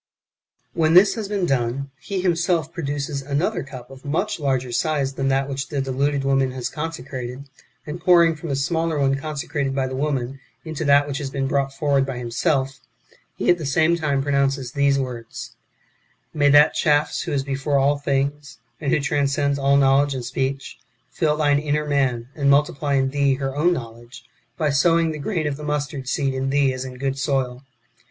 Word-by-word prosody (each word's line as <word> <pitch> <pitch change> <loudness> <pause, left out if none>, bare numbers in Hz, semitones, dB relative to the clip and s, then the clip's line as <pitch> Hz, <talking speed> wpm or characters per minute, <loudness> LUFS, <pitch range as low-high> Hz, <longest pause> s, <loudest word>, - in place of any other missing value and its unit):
Yfhen 160 -1 +3
this 195 +2 +7
has 220 -3 -4
been 200 -3 0
done, 135 -1 -1
he 195 -2 -3
himself 170 -2 0
produces 145 -3 -3
another 145 +10 -1
cup 130 -2 -10
of 135 0 -13
much 170 +8 -1
larger 130 -4 -1
size 140 +1 0
than 135 0 -2
that 135 0 +1
which 135 -1 -4
the 145 - -3
deluded 135 +1 0
w^oman 135 -1 +2
has 130 -2 -3
consecrated, 135 -4 -6 0.4
and 160 +3 -6
pouring 170 -2 +5
from 160 +1 -7
the 140 - 0
smaller 160 +3 0
one 135 -1 +2
consecrated 140 -1 -3
by 135 -1 +1
the 130 0 -4
woman 135 -2 -2 0.3
into 160 -1 -4
that 145 0 +4
which 140 +1 -3
has 140 -2 -4
been 135 0 -2
brought 140 0 0
forward 140 0 +1
by 135 -2 -4
himself, 130 +3 -1 0.6
he - - -3
at 175 - +1
the - - -5
same 160 +4 +3
time 145 -5 0
pronounces 140 -2 0
these 140 0 +2
words: 125 -4 -6 0.4
" - - -41
May 145 -2 +3
that 145 +2 +6
Charis 150 -1 +1
who - - -4
is 140 -2 0
before 140 +1 -1
all 140 +1 +2
things, 140 -1 -2 0.2
and 140 -4 -2
who - - +3
transcends 140 -1 0
all 140 0 +3
knowledge 140 +1 +3
and 125 -2 -4
speech, 135 +2 -3 0.3
fill 150 -2 0
thine 145 -2 +3
inner 150 0 -1
man, 135 -5 0
and 140 -2 +1
multiply 140 0 +2
in 135 -1 +1
thee 140 -1 +2
her 135 0 -4
own 165 +5 +3
knowledge, 120 -3 -7 0.3
by 155 -3 +1
sowing 165 +3 +3
the 155 - -6
grain 165 +1 -2
of 145 -1 -2
mustard 145 -2 -3
seed 135 -1 0
in 130 0 -2
thee 140 -1 +2
as 130 0 -5
in 130 -1 -8
good 135 +1 -2
soil." 135 -2 -1
140 Hz, 190 wpm, -22 LUFS, 135-150 Hz, 0.6 s, this